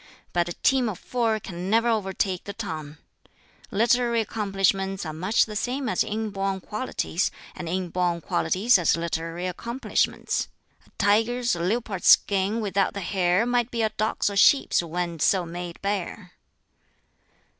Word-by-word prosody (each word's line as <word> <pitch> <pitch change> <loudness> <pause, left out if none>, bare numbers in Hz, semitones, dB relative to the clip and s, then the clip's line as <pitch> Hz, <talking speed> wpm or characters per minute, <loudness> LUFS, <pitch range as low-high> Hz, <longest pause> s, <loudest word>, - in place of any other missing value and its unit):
But 175 0 +1
'a - - -4
team 255 +2 +2
of 195 - -5
four 225 0 -1
can 180 -2 -6
ne'er 230 +2 +3
o'er 215 -4 0
take 190 -1 -2
the 200 - -5
tongue!' 160 -8 -6 0.7
Literary 235 +2 +2
accomplishments 195 -3 0
are 155 - -4
much 185 +8 +2
the 215 - -8
same 255 +5 -2
as - - +1
inborn 200 -3 -2
qualities, 210 -5 -2 0.3
and 170 - -6
inborn 180 -1 -1
qualities 190 +9 +2
as 170 - +2
literary 165 +1 -3
accomplishments. 235 +8 -1 0.4
A - - -23
tiger's 225 +3 +2
or 170 - -5
leopard's 205 -1 -1
skin 200 +3 +4
without 200 -2 0
the 200 - -3
hair 185 +2 +1
might 245 -1 +1
be 230 -2 -1
a 220 - +2
dog's 215 +1 -1
or 200 - -1
sheep's 270 +4 +5
when 170 0 -3
so 180 +3 +2
made 175 0 -7
bare." 200 -1 -3
195 Hz, 150 wpm, -25 LUFS, 180-225 Hz, 0.7 s, sheep's